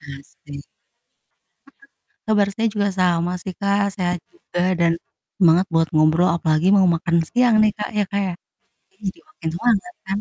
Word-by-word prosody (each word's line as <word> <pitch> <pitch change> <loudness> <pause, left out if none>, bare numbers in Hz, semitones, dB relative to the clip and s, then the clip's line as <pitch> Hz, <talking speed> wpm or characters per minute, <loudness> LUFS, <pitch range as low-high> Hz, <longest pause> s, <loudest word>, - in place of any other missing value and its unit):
Pasti. 140 0 -11 1.0
Heeh. 415 +9 -24 0.4
Kabar 210 -2 +3
saya 225 0 0
juga 205 -1 0
sama 175 -1 +1
sih, 190 - -6
Kak, 200 0 +1
sehat 180 -2 -2
juga 350 - -5 0.2
dan 170 -1 +3 0.5
semangat 175 0 +4
buat 165 0 +3
ngobrol 155 +3 +3
apalagi 160 +1 +1
mau 190 - +4
makan 170 0 0
siang 245 -2 +3
nih, 215 - +3
Kak, - - -4
ya, 205 - +3
Kak, 200 - 0
ya, 180 - -3 0.6
jadi 190 - -36
jadi - - -24
makin 170 - -6
semangat 235 - 0
kan? 195 +1 -2
185 Hz, 165 wpm, -21 LUFS, 165-210 Hz, 1.0 s, semangat